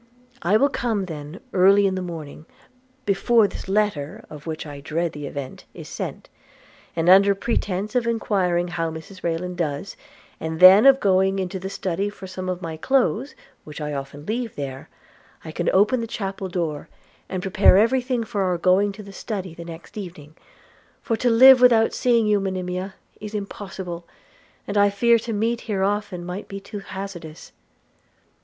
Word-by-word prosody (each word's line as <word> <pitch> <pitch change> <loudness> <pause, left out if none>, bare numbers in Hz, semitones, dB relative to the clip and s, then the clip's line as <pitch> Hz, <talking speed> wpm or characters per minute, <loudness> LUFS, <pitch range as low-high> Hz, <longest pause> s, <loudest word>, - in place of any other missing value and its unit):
– 250 0 -31
I 215 - +6
will 280 - +4
come 230 -7 -1
then 155 +1 -8
early 195 +2 +5
in 195 - +1
the 185 - -3
morning, 160 -3 -8 0.6
before 210 +2 +3
this - - -9
letter, 195 -8 -1
of 150 +1 -10
which 160 -1 -4
I 145 -2 -8
dread 165 +4 -2
the 145 -1 -7
event, 140 -1 -7
is - - -9
sent; - - -6 0.7
and, 165 0 -1
under 195 +2 +7
pretence 205 -1 -2
of 245 -2 +1
enquiring 185 -6 0
how 165 -1 -2
Mrs 160 +4 -10
Rayland 175 +2 -3
does, 155 +2 -3 0.4
and 160 0 -4
then 190 +7 +9
of 270 0 +7
going 195 -2 +2
into 190 0 -3
the 190 +1 -5
study 195 0 -2
for 205 - -11
some 185 0 -6
of 180 0 -4
my 160 -1 -5
clothes, 265 - 0 0.3
which 150 0 -9
I 150 -1 -4
often 140 +1 -7
leave 230 +2 -3
there, 135 -2 -6 0.6
I 160 - -6
can 175 +2 -1
open 210 +6 +3
the 230 - -4
chapel 195 -3 -4
door, 165 -5 -3 0.4
and 185 -1 -4
prepare 195 0 +5
everything 245 +2 +2
for 205 -2 -3
our 180 -2 +1
going 190 +4 +3
to 210 +1 -10
the 200 0 -12
study 190 -3 -5
the 170 0 -9
next 165 0 -11
evening; 160 -6 -9 0.7
for 230 - 0
to 245 - +1
live 255 +2 +8
without 230 -3 +5
seeing 235 -3 +2
you, 210 -1 +3
Monimia, 185 0 -4 0.2
is 210 0 -7
impossible, 190 -4 -6 0.6
and 205 0 0
I 205 0 +5
fear 230 +3 +3
to 230 +1 -5
meet 225 +2 -1
here 195 -2 0
often 200 -3 -2
might 180 +3 -6
be 195 - -7
too 205 +1 -8
hazardous.' 190 -5 -8
190 Hz, 175 wpm, -23 LUFS, 170-210 Hz, 0.7 s, then